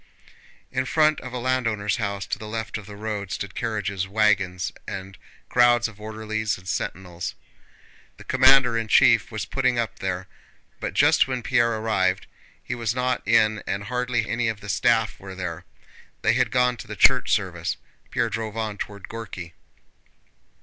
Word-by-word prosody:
In 130 - 0
front 155 0 +3
of 130 - -7
a 125 - -4
landowner's 115 -5 0
house 100 -3 -2
to - - -3
the 110 - -7
left 110 0 -4
of 105 - -13
the 105 - -9
road 105 -2 -4
stood 100 -1 -4
carriages, 100 -4 -2
wagons, 95 -3 +1 0.2
and 95 0 -6 0.3
crowds 120 -1 +4
of 105 -2 -14
orderlies 110 0 -2
and 90 +1 -15
sentinels. 90 -2 -4 0.8
The - - -12
commander 130 -2 +5
in 115 - -3
chief - - +5
was - - -3
putting 125 -2 +1
up 115 -2 -2
there, 95 -1 -2 0.5
but - - -4
just - - +5
when 130 -2 -3
Pierre 120 -1 +2
arrived 95 -4 0 0.4
he - - -4
was 115 -1 -2
not 125 0 0
in 110 -1 +4
and 100 +1 -2
hardly 125 0 -1
any 115 +1 0
of 110 -2 -2
the 100 -1 -9
staff - - +2
were 95 -1 -9
there—they 90 -3 -4
had - - +2
gone 125 -1 +2
to - - -9
the - - -6
church - - +5
service. - - 0 0.3
Pierre - - 0
drove 110 0 -4
on 110 -2 -3
toward 100 -2 -6
Górki. 95 -7 -7
110 Hz, 165 wpm, -24 LUFS, 100-120 Hz, 0.8 s, commander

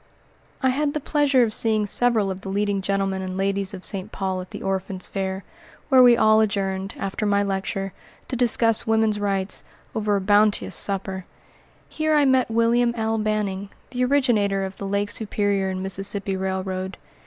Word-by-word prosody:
I 260 - +4
had 285 +2 -1
the - - +1
pleasure 280 -3 +2
of 220 -2 0
seeing 215 -2 +2
several 220 -2 +2
of 190 0 -6
the 195 - -7
leading 200 0 0
gentlemen 195 0 -1
and 185 0 -5
ladies 195 0 -1
of 190 -2 -9
St. 195 +1 -2
Paul 190 -1 -2
at 185 - -10
the - - -8
Orphans' 190 -1 -3
Fair, 190 -1 -3 0.5
where 260 -2 +7
we 245 -1 +7
all 215 0 +5
adjourned, 195 -2 -1
after 195 +2 -4
my 200 0 +2
lecture, 195 0 -3 0.3
to - - -4
discuss 230 -2 +1
woman's 220 -1 +2
rights, 195 -1 -1 0.3
over 210 -1 0
a 200 - 0
bounteous 205 +1 +2
supper. 190 -2 -2 0.6
Here 310 0 0
I 295 -1 +4
met 260 -2 +3
William 235 +1 +2
L. 220 0 0
Banning, 205 -2 -2 0.2
the 250 0 -1
originator 235 -8 +2
of 190 0 -8
the 200 - -5
Lake 200 +1 -1
Superior 205 -3 -1
and 185 0 -3
Mississippi 195 0 -1
Railroad. 190 0 -3
200 Hz, 175 wpm, -23 LUFS, 195-225 Hz, 0.6 s, where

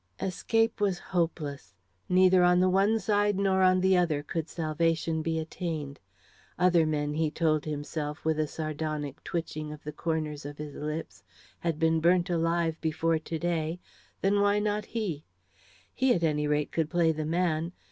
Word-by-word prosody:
Escape 225 +4 0
was 195 -3 +2
hopeless. 155 - -3 0.3
Neither 185 0 +5
on 180 0 +5
the 185 0 +3
one 200 +4 +3
side 205 -2 +1
nor 195 -1 +2
on 185 0 +5
the 190 0 +4
other 165 -5 +1
could 165 +1 -4
salvation 165 0 0
be 160 0 -1
attained. 160 -3 -4 0.6
Other 175 -3 +4
men, 150 -1 -1
he 155 0 +1
told 155 -1 +1
himself, 150 0 -4
with 160 -1 +1
a 155 - +1
sardonic 155 -2 -4
twitching 155 -3 -4
of 150 0 -10
the 150 - -5
corners 155 -1 -3
of 145 +1 -7
his 150 -1 -7
lips, 150 +3 -5 0.4
had 165 -3 -1
been 160 0 +2
burnt 175 +2 +3
alive 165 -1 0
before 160 0 +1
to 160 +1 -5
day 165 0 -1 0.4
then 200 +1 +2
why 205 0 +3
not 210 0 -1
he? 190 -10 -3 0.7
He, 260 -1 +3
at 170 - -2
any 150 -2 +1
rate, 150 0 0
could 160 -2 0
play 170 -1 +3
the 155 -1 -3
man. 165 -1 0
165 Hz, 165 wpm, -28 LUFS, 155-180 Hz, 0.7 s, Neither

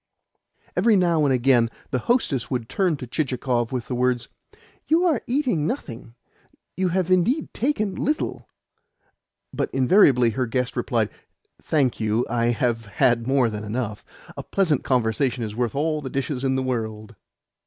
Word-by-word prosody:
Every 215 +4 +4
now 170 -5 +3
and 140 - +2
again 125 -2 +3 0.2
the 130 - 0
hostess 145 - 0
would 125 -4 -2
turn 180 -1 0
to 130 - -7
Chichikov 125 -3 -1
with 125 -2 -3
the - - -4
words, 125 -1 0 0.6
"You 335 +3 +3
are 315 -9 +2
eating 245 - 0
nothing 120 - -6 0.6
you 185 0 0
have 185 0 0
indeed 190 - +2
taken 215 -5 -1
little;" 300 +3 -2 1.0
but - - -1
invariably 130 - +4
her 130 +2 -1
guest 125 +1 -2
replied: - - 0 0.5
"Thank 140 -6 +1
you, 110 +2 +1
I 115 0 0
have 120 -2 0
had 115 +3 +1
more 135 -2 +3
than 105 -1 -5
enough. 105 -1 -4 0.3
A - - -5
pleasant 170 -8 0
conversation 125 0 0
is 105 -1 -5
worth 120 0 -1
all 155 +1 0
the 135 - -5
dishes 135 0 -3
in 130 -1 +1
the 130 - 0
world." 110 -3 -4
130 Hz, 155 wpm, -23 LUFS, 120-170 Hz, 1.0 s, Every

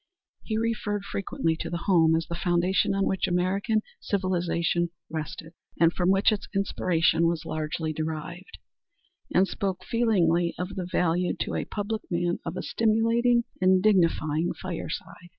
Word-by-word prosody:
He 220 - -3
referred 215 -3 -1
frequently 165 -5 -1
to - - -4
the 170 0 -4
home 165 -4 +4
as 165 0 0
the 170 - -6
foundation 180 +3 +1
on 195 - +1
which 190 - 0
American 195 +5 +1 0.2
civilization 175 -3 0 0.2
rested, 160 +1 -6 0.3
and 165 0 +5
from 180 0 +1
which 195 +3 +4
its 210 - -3
inspiration 170 -4 +2
was 165 -2 -1
largely 155 0 -3
derived, 160 +3 -5 0.7
and 190 +2 +4
spoke 190 -2 -3
feelingly 175 -8 +2
of 180 +1 -3
the 185 -2 -5
value 180 +1 +1
to - - -2
a - - -2
public 215 +1 -3
man 175 0 0
of - - -5
a - - -3
stimulating 230 +2 +2 0.2
and 185 0 +4
dignifying 170 -5 +2
fireside. 175 0 -6
180 Hz, 150 wpm, -27 LUFS, 170-200 Hz, 0.7 s, and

